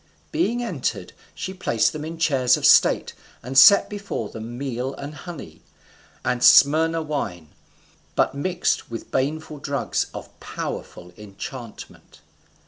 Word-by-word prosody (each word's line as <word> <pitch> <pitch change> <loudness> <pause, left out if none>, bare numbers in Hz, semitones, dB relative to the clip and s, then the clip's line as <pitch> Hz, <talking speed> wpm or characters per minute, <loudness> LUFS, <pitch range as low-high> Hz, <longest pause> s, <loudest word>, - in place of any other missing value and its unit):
Being 245 -8 0
entered, 235 - -3 0.2
she 190 - -5
placed 115 -11 0
them 150 - -6
in 165 +2 -6
chairs 135 -6 +3
of - - -2
state, - - +5 0.3
and 130 +3 -6
set 200 +9 +8
before 200 - -5
them 115 +2 -8
meal 130 0 -4
and 145 +2 -8
honey, 145 - -10 0.6
and 125 -1 0
Smyrna 160 +3 +5
wine, 100 - -4 0.7
but - - +2
mixed 175 +6 -1
with 115 -1 -8
baneful 150 +3 -2
drugs 140 0 -2
of - - -11
powerful 90 0 -7
enchantment. 105 +3 -10
140 Hz, 130 wpm, -23 LUFS, 120-160 Hz, 0.7 s, set